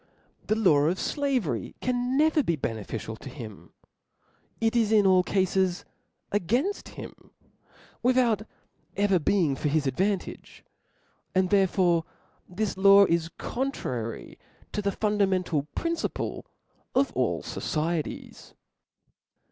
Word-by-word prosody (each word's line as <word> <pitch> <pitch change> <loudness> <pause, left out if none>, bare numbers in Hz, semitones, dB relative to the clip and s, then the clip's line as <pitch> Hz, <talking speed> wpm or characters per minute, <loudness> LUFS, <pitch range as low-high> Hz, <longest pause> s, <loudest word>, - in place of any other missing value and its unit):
The 215 - +2
law 155 -10 +4
of 180 +3 +1
flavery 250 - -1
can 250 +1 -1
never 310 +1 +4
be 170 - 0
beneficial 110 -4 -4
to 135 - -9
him; 110 - -10 0.9
it 225 +1 +1
IS 225 -3 +2
in 210 -2 +5
all 185 -1 +6
cales 185 -1 0 0.5
againft 240 - 0
him, - - -10 0.7
without 245 -4 +3 0.6
ever 195 -2 +3
being 165 -4 +2
for 150 - -2
his 150 0 +1
advantage; 185 - -2 0.7
and 185 0 +2
therefore 185 -4 +3 0.5
this 195 +2 -2
law 200 +1 +7
is 170 -2 0
contnuy 130 - -4 0.3
to 210 - -2
the 200 0 0
fundamental 190 -8 0
principle 335 0 -3 0.5
of 270 +2 +2
all - - 0
focieties. 160 0 -4
190 Hz, 110 wpm, -27 LUFS, 160-225 Hz, 0.9 s, law